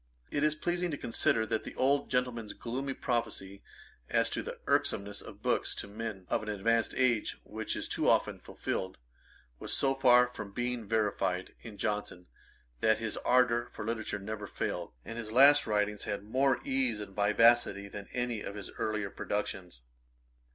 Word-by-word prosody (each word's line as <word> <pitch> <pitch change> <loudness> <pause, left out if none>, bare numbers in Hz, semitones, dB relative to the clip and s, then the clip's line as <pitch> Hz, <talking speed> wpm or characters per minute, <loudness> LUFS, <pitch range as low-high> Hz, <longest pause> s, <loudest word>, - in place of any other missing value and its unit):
It 145 - 0
is 155 0 +3
pleasing 175 +3 -1
to 145 - -3
consider 115 -2 +1
that 110 0 -1
the - - -8
old 140 +2 +2
gentleman's 125 -4 -1
gloomy 130 +3 -4
prophecy 110 -5 -2 0.5
as - - +2
to - - -1
the - - -6
irksomeness 100 0 0
of - - -12
books - - +1
to - - -4
men 105 -2 -6
of - - 0
an 110 - -6
advanced 110 +2 +1
age, 120 -4 +2
which 110 0 -4
is - - -3
too - - +1
often - - +2
fulfilled, 95 0 -4 0.6
was - - -4
so 135 -1 +3
far 125 -2 +5
from 100 -3 -7
being 120 -2 -2
verified 100 -4 0
in 110 -3 -10
Johnson, 105 -4 -2 0.5
that 110 - +4
his 110 -1 -3
ardour 120 -1 +3
for - - -6
literature 110 -2 -2
never 105 +1 -5
failed, 90 -2 -3
and 115 +1 -6
his 110 -2 -6
last 140 +4 +7
writings 105 -1 0
had 100 -1 -3
more 130 +5 +2
ease 130 -5 0
and 100 -2 -8
vivacity 105 -1 +4
than 100 0 -8
any 120 -3 -2
of 100 - -6
his 100 -2 -7
earlier 105 -2 -1
productions. 95 -10 -4
110 Hz, 170 wpm, -31 LUFS, 105-125 Hz, 0.6 s, last